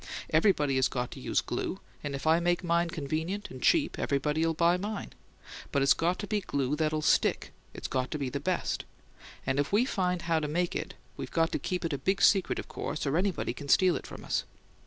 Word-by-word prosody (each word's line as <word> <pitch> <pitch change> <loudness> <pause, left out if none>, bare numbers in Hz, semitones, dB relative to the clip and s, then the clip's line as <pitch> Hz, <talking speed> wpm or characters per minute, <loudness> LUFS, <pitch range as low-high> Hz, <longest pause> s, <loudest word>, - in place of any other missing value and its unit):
Everybody 150 -10 +3
has 130 0 +3
to 125 -1 -4
use - - +1
glue, - - -3 0.2
and 145 -1 -3
if 135 - -6
I 160 +1 +5
make 175 +1 +1
mine 170 0 +2
convenient 165 +6 -3
and 130 - -9
cheap, 310 -3 +3
everybody'll 150 +3 +1
buy 170 +2 +4
mine. 205 +3 -4 0.6
But 140 - +2
it's 140 - +6
got 175 +2 0
to - - -4
be 210 0 -1
glue 140 -5 -1
that'll 155 0 0
STICK; - - +2 0.2
it's - - -5
got 130 -1 -1
to - - -3
be 140 -2 -2
the 140 +3 -3
best; 180 +5 -1 0.6
and 135 +1 0
if 145 - 0
we 215 +5 +4
find 180 -7 -1
how 165 -1 +2
to 150 - -2
make 175 +4 -1
it - - -4 0.2
we've - - -5
got 165 0 +1
to - - -1
keep 180 -1 -2
it 165 - -1
a 140 - -2
big 190 +1 0
secret, 195 -3 +4
of - - -5
course, 150 +1 -4
or 140 +1 0
anybody 185 +1 0
can 145 -1 -9
steal 185 +2 +5
it - - -5
from - - -9
us. - - 0
165 Hz, 220 wpm, -29 LUFS, 145-180 Hz, 0.6 s, it's